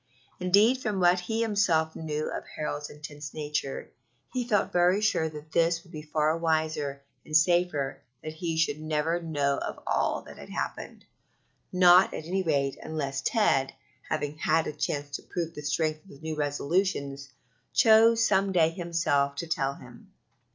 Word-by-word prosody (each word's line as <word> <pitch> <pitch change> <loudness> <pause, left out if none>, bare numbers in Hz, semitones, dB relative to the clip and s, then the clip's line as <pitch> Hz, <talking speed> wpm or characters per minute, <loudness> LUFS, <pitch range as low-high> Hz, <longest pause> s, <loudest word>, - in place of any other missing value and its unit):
Indeed, 205 +8 +4
from 210 -5 -1
what 180 0 +4
he 220 +6 -1
himself 180 -8 +1
knew 155 -1 -3
of - - -4
Harold's 150 -1 -4
intense 145 0 -9
nature, 150 -3 -3 0.4
he 250 -2 -2
felt 210 -4 +1
very 180 +2 +4
sure 185 -7 +1
that 155 0 -11
it 165 0 +3
would 170 - -19
be 155 -3 -7
far 155 +1 0
wiser 155 -4 -1 0.2
and 155 - +3
safer 160 -5 +1 0.2
that 155 - -5
he 165 0 -3
should 155 -2 +1
never 155 +2 -1
know 145 -4 0
of - - -5
all - - 0
that - - -13
had - - -11
happened - - -5 0.7
not, 180 0 +6
at 155 - -6
any 190 +3 -1
rate, 140 -6 0
unless 140 -4 -3
Ted, 135 - +1 0.3
having 145 +1 -2
had 160 +1 +2
a - - -4
chance 145 -1 -3
to - - -15
prove 170 -2 -4
the 150 - -7
strength 155 +1 -1
of - - -18
his 140 - -14
new 160 0 -3
resolutions, 145 -1 -1 0.4
chose 225 0 +5
some 195 0 +2
day 165 -4 +4
himself 165 -5 0
to 155 - -4
tell 140 -4 -1
him. 120 -1 -15
160 Hz, 165 wpm, -28 LUFS, 145-180 Hz, 0.7 s, not